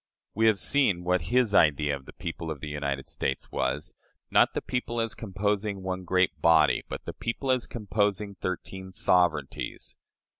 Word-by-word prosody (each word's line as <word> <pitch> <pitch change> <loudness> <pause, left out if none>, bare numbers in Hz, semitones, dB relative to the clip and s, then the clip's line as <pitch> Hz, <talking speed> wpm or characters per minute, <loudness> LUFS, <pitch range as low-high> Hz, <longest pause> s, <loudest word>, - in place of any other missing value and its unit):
We 110 +2 +3
have 110 -2 +4
seen 100 -7 +2
what 90 -2 +1
his 120 -3 +3
idea 75 -4 +4
of 70 -1 -11
"the - - -11
people 85 -1 -5
of 80 -3 -4
the 75 - -6
United 70 -2 -3
States" 65 - -3
was - - -2 0.4
"not - - +4
the - - 0
people 120 -1 -2
as 115 0 0
composing 100 -1 -2
one 95 0 -3
great 90 -4 +1
body, 80 -2 +5
but - - -6
the - - -5
people 130 +3 -2
as 130 -2 +1
composing 105 -2 -1
thirteen 95 0 -5
sovereignties." 85 -6 0
95 Hz, 165 wpm, -27 LUFS, 80-105 Hz, 0.4 s, body